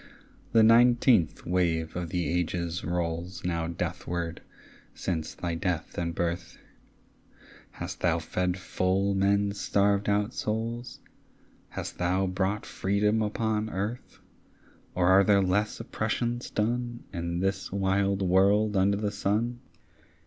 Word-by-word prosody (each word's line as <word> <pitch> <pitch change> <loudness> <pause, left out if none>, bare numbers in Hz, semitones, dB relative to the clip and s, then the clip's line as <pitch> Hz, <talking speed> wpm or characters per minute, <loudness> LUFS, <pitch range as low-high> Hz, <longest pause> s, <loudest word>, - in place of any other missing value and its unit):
The 115 -1 +6
nineteenth 120 - +4
wave 85 -3 0
of 85 -2 -3
the 90 0 -1
ages 85 0 -1
rolls 85 +1 -3
Now 85 -2 -1
deathward 85 0 -3 0.6
since 80 -4 -3
thy 85 -1 -3
death 85 0 -2
and 85 -1 -2
birth. 85 0 -3 1.2
Hast 85 0 -6
thou 85 -2 +2
fed 90 +3 -1
full 95 +2 0
men's 100 +1 +1
starved 100 0 +2
out 105 +3 +1
souls? 115 +3 -3 0.7
Hast - - -6
thou 90 +2 +1
brought 95 +3 -1
freedom 105 +3 +1
upon 110 0 -1
earth? 105 +6 -4 0.8
Or 90 -1 +2
are 95 +2 +6
there 100 0 +4
less 100 +3 0
oppressions 120 0 -2
done 120 +2 -2
In 85 -1 -2
this 95 +1 -1
wild 100 0 +1
world 100 +3 +3
under 100 +1 +3
the 105 0 -1
sun? 110 +4 -1
95 Hz, 120 wpm, -28 LUFS, 85-105 Hz, 1.2 s, The